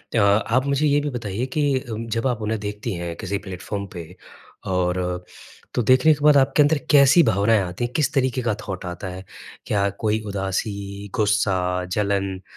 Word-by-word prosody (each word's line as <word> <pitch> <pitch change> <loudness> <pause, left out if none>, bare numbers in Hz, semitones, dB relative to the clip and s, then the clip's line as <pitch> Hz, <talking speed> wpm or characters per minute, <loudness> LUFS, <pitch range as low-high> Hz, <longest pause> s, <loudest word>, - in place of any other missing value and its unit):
अ - - +4
आप 110 +6 +3
मुझे 140 +2 +1
ये 145 0 +3
भी 145 - -2
बताइए 115 -2 -3
कि 145 -3 +1
उम, 115 +1 -5
जब 115 +3 -1
आप 120 -3 -2
उन्हें 110 0 -2
देखती 105 +1 -4
हैं 85 -1 -5
किसी 100 +2 -3
प्लेटफ़ॉर्म 100 +1 -6
पे 85 +1 -9 0.5
और 90 -1 -1 0.5
तो 125 - +1
देखने 130 +7 +5
के 145 -1 -6
बाद 150 -1 +7
आपके 135 +2 +3
अंदर 150 +1 +4
कैसी 145 +4 +7
भावनाएँ 110 -1 +3
आती 90 +5 -4
हैं 120 - -7
किस 150 - +1
तरीके 130 -1 +1
का 115 -4 0
थॉट 95 -2 -5
आता 90 +1 -6
है? 95 +1 -8 0.4
क्या 100 -1 +1
कोई 110 0 +1
उदासी, 100 +1 -4
गुस्सा, 95 -4 +1
जलन, 100 0 -1
105 Hz, 180 wpm, -22 LUFS, 95-130 Hz, 0.5 s, बाद